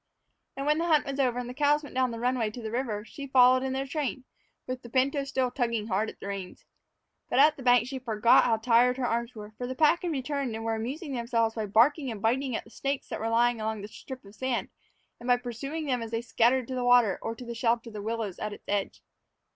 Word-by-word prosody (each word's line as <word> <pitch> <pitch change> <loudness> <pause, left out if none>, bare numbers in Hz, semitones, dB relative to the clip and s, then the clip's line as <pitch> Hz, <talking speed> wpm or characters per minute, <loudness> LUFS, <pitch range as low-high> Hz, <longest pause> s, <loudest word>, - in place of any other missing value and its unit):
And 275 - -3
when 300 +1 +2
the 340 - 0
hunt 310 -3 +3
was 275 0 -4
over 250 -3 +2
and 250 -1 -3
the 250 - -6
cows 295 +2 +2
went 290 - -10
down 255 0 +1
the 230 - -5
runway 245 -2 0
to 240 +3 -9
the 220 - -4
river, 230 -4 -2
she 280 +3 -8
followed 255 -1 +6
in 265 0 -2
their 265 +1 -2
train, 275 -2 -3 0.4
with 255 0 -5
the 240 - -11
pinto 275 +3 +1
still 260 -2 -1
tugging 235 -4 -1
hard 210 +3 0
at - - -12
the - - -9
reins. 195 -2 -6 0.6
But - - 0
at 295 +3 +6
the - - -11
bank 245 -1 +4
she 265 0 -5
forgot 230 -2 +4
how 225 - +2
tired 245 +2 +3
her 260 - -1
arms 235 +1 -2
were, 210 -1 -9
for 245 - -3
the 260 - -4
pack 315 +4 +4
had 355 - -2
returned 280 -4 -2
and 225 0 -5
were 225 - 0
amusing 270 +8 -4
themselves 235 -2 0
by 220 -2 -3
barking 255 +7 +3
and 220 -3 -5
biting 250 +4 0
at - - -3
the 230 - -18
snakes 275 +2 -3
that - - -4
were 225 - -2
lying 235 0 +2
along 215 -1 -3
the - - -6
strip 255 +2 -10
of 200 - -14
sand, 255 +1 -2 0.5
and 240 - -9
by 245 0 +5
pursuing 270 +6 -5
them 255 -4 0
as 230 - -5
they 225 0 -2
scattered 240 +1 +2
to - - -3
the 250 -1 -2
water 245 -5 +4
or 225 - -4
to 245 - -10
the 235 - -5
shelter 230 0 0
of - - -17
the 210 - -6
willows 220 -3 -3
at 210 -1 -3
its - - -13
edge. 200 -1 -2
245 Hz, 260 wpm, -28 LUFS, 225-265 Hz, 0.6 s, followed